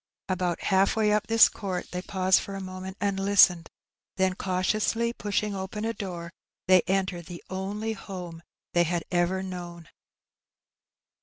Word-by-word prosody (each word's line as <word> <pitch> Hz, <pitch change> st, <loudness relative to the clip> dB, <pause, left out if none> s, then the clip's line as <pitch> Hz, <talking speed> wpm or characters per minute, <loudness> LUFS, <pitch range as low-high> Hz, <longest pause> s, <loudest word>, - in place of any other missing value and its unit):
About 180 Hz, -2 st, -1 dB
half 195 Hz, 0 st, +3 dB
way 215 Hz, -1 st, +2 dB
up 210 Hz, 0 st, +1 dB
this 225 Hz, 0 st, +7 dB
court 190 Hz, -4 st, -5 dB
they 180 Hz, -, -3 dB
paused 185 Hz, 0 st, +2 dB
for 200 Hz, -, -6 dB
a -, -, -4 dB
moment 185 Hz, 0 st, -7 dB
and 200 Hz, -1 st, 0 dB
hstened; 190 Hz, -4 st, +5 dB, 0.5 s
then, 190 Hz, -1 st, +2 dB
cautiously 215 Hz, +5 st, 0 dB
poshing 210 Hz, -1 st, -1 dB
open 195 Hz, +3 st, -4 dB
a 230 Hz, -, -1 dB
door, 175 Hz, -5 st, -6 dB, 0.3 s
they 185 Hz, -1 st, +7 dB
entered 185 Hz, -3 st, -1 dB
the 175 Hz, -1 st, -9 dB
only 205 Hz, +4 st, -3 dB
home 180 Hz, -5 st, -8 dB, 0.3 s
they 175 Hz, -, +4 dB
had 175 Hz, 0 st, 0 dB
ever 180 Hz, +2 st, +1 dB
known. 175 Hz, -3 st, -7 dB
190 Hz, 150 wpm, -27 LUFS, 180-200 Hz, 0.5 s, this